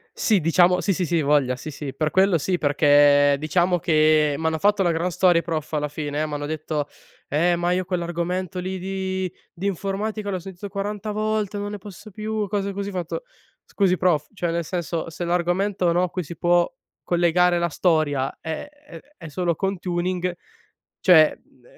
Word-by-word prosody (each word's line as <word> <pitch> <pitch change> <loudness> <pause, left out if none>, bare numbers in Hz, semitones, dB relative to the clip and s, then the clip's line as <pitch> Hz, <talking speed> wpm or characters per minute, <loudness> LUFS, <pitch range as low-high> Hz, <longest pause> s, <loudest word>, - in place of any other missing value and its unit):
Sì, 210 -4 +2
diciamo 175 +3 +3
sì, 195 - +1
sì, 180 0 -1
sì, 170 -1 +1
voglia, 140 -3 +2
sì, 155 - -8
sì. 145 -2 -6
Per 155 -1 -1
quello 190 -2 +4
sì, 180 +4 0
perché, 145 -1 +5
diciamo 175 +4 +1
che, 155 -2 +3
m'hanno 160 0 0
fatto 205 +2 +2
una 175 -2 +3
gran 170 +2 -1
storia 175 -1 +3
i - - -21
prof 160 -2 -4
alla 150 0 0
fine. 150 0 -3
M'hanno 145 -1 -4
detto: 155 -1 -3 0.4
"Eh, 170 +4 +2
ma 175 +1 0
io 185 0 0
quell'argomento 180 0 -2
lì 185 +1 -4
di 190 -1 -3 0.2
di 190 +3 -3
informatica 205 +2 -3
l'ho 185 -2 -2
sentito 195 +2 -8
40 205 +1 -4
volte, 215 -1 -1
non 205 0 -4
ne 210 - -5
posso 205 +2 -11
più". 215 0 -3
Cose 200 0 -2
così. 200 +1 -4
Ho - - -7
fatto: 180 - -4 0.4
"Scusi 190 -3 +1
prof, 155 -4 +1
cioè, 175 -4 -2
nel 170 -1 -2
senso, 170 -2 -3
se 170 +2 -6
l'argomento, 175 +1 +1
no, 175 +1 +2
a 180 - 0
cui 180 0 -3
si 170 +3 -9
può 175 0 +2 0.3
collegare 175 0 +3
la 170 0 0
storia 150 -5 0
è 160 - -5
è 295 0 -14 0.2
è 165 - -10
solo 170 +2 -1
con 195 +1 -2
Tuning, 180 0 -2 0.7
cioè 160 -5 +6
mhmm, 125 - -30
175 Hz, 185 wpm, -23 LUFS, 155-190 Hz, 0.7 s, cioè